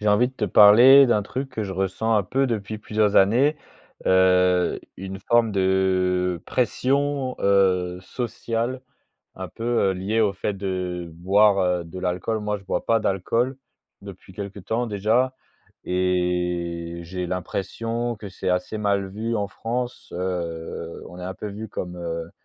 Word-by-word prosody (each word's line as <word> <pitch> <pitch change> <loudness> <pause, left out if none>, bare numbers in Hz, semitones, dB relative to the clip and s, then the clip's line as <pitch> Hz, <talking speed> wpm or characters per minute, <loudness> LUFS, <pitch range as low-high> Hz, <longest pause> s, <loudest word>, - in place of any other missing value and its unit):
J'ai 105 - 0
envie 110 +4 +4
de 130 - -17
te - - -2
parler 120 +8 +8
d'un 110 -4 +2
truc 130 +7 -4
que 110 -4 -3
je 95 - -5
ressens 95 +4 -1
un 105 - +3
peu, 135 +9 0
depuis 110 -3 -3
plusieurs 105 -1 0
années. 125 +10 +4 0.5
Heu, 90 -1 +3 0.2
une 95 +1 -7
forme 120 0 +2
de, 95 -2 +1
pression, 135 +1 0
heu, 90 -2 +2
sociale. 120 +4 -3 0.6
Un 95 -1 -6
peu, 115 - -8 0.3
heu, - - +1
liée, 100 +5 -1
au 105 -3 +3
fait 100 +1 -3
de 90 -3 -4
boire, 100 +4 +3
heu, 90 -1 0
de 85 +3 -9
l'alcool. 90 +5 -1
Moi, 105 0 -2
je 100 - -18
bois - - -3
pas 115 -1 +3
d'alcool, 115 +7 0 0.5
depuis 95 -1 -12
quelque 100 +1 -6
temps 115 +6 -2
déjà, 115 +5 +1 0.5
et 90 -2 -1
j'ai 90 +1 -4
l'impression 115 +6 -3
que 105 -1 -8
c'est 95 - -5
assez 90 +4 -1
mal 100 -2 0
vu 110 +4 -3
en 100 -1 -1
France, 120 +4 -5
heu, 85 -2 -4
on 90 - -11
est - - -6
un 95 +1 -5
peu 105 - -7
vu 105 +2 -7
comme, 90 -2 -6
heu, 85 -1 -5
100 Hz, 160 wpm, -23 LUFS, 90-115 Hz, 0.6 s, parler